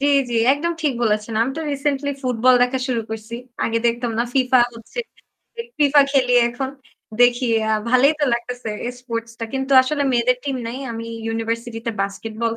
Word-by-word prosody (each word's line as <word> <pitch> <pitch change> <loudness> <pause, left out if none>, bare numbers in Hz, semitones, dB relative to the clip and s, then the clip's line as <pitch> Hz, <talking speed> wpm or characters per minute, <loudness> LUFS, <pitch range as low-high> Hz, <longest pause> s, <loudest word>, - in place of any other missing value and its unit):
জ্বী 285 - +2 0.2
জ্বী, 235 - -1 0.2
একদম 325 +5 -1
ঠিক 295 - +2
বলেছেন। 215 0 0
আমি 250 - -1
তো - - -2
রিসেন্টলি 280 0 -1
ফুটবল 250 0 +3
দেখা 250 +1 +1
শুরু 240 -2 0
করছি। 220 +1 -6 0.3
আগে 230 0 0
দেখতাম 235 0 0
না 235 - +2
ফিফা 260 -1 +4 0.2
হচ্ছে। 230 - -12 0.8
ফিফা 290 0 +5
খেলি 255 -3 +2 0.2
এখন 250 +3 -4 0.5
দেখি 245 +1 +4 0.3
আ - - +2 0.2
ভালই 255 +2 +5
তো - - +4
লাগতেছে 240 0 -5 0.2
এই 245 - -3
স্পোর্টস 230 -2 -5
টা। 230 - -3
কিন্তু 265 +1 -2
আসলে 285 +2 -1
মেয়েদের 245 +1 +2
টিম 275 -2 -2
নাই। 240 +3 -5
আমি 230 0 -6 0.2
ইউনিভার্সিটি 225 +1 -3
তে - - +1
বাস্কেটবল 220 +3 -3
245 Hz, 175 wpm, -21 LUFS, 230-270 Hz, 0.8 s, ফিফা